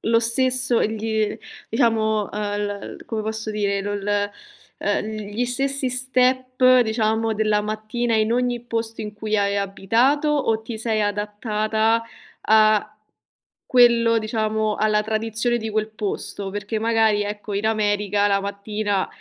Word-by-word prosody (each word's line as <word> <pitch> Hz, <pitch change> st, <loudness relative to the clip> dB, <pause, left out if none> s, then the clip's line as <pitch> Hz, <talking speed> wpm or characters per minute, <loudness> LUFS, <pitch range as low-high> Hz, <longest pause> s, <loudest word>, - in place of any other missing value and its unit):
lo 230 Hz, 0 st, +2 dB
stesso 250 Hz, +1 st, +2 dB
gl 220 Hz, 0 st, -1 dB, 0.3 s
diciamo, 220 Hz, -2 st, +1 dB
uhm, 210 Hz, -, -5 dB, 0.2 s
l 205 Hz, -1 st, -5 dB
come 220 Hz, -2 st, -3 dB
posso 220 Hz, 0 st, -3 dB
dire, 200 Hz, -2 st, -1 dB
lo 205 Hz, +1 st, -3 dB
l 205 Hz, 0 st, -1 dB, 0.5 s
ehm, 205 Hz, +1 st, -1 dB, 0.3 s
gli 245 Hz, +4 st, -1 dB
stessi 270 Hz, +2 st, -1 dB
step, 255 Hz, 0 st, +3 dB
diciamo, 220 Hz, 0 st, 0 dB
della 215 Hz, -1 st, +1 dB
mattina 215 Hz, +3 st, -2 dB
in 220 Hz, +1 st, +2 dB
ogni 245 Hz, -1 st, 0 dB
posto 230 Hz, -1 st, -3 dB
in 210 Hz, -1 st, -6 dB
cui 215 Hz, +1 st, -3 dB
hai 200 Hz, -1 st, +1 dB
abitato, 225 Hz, +9 st, +1 dB
o 270 Hz, -7 st, +1 dB
ti 225 Hz, +1 st, -7 dB
sei 220 Hz, -1 st, -1 dB
adattata 215 Hz, +2 st, 0 dB, 0.4 s
a 215 Hz, -1 st, +4 dB, 0.8 s
quello 235 Hz, -2 st, +5 dB
diciamo, 215 Hz, -1 st, -1 dB
alla 215 Hz, 0 st, +2 dB
tradizione 225 Hz, +2 st, -1 dB
di 220 Hz, -1 st, -4 dB
quel 215 Hz, 0 st, -1 dB
posto? 205 Hz, -2 st, -3 dB
Perché 205 Hz, +2 st, -3 dB
magari, 220 Hz, -2 st, +2 dB
ecco, 205 Hz, 0 st, -6 dB
in 205 Hz, +2 st, -1 dB
America 205 Hz, -2 st, +1 dB
la 200 Hz, -1 st, +2 dB
mattina 200 Hz, 0 st, -2 dB
220 Hz, 135 wpm, -22 LUFS, 210-230 Hz, 0.8 s, quello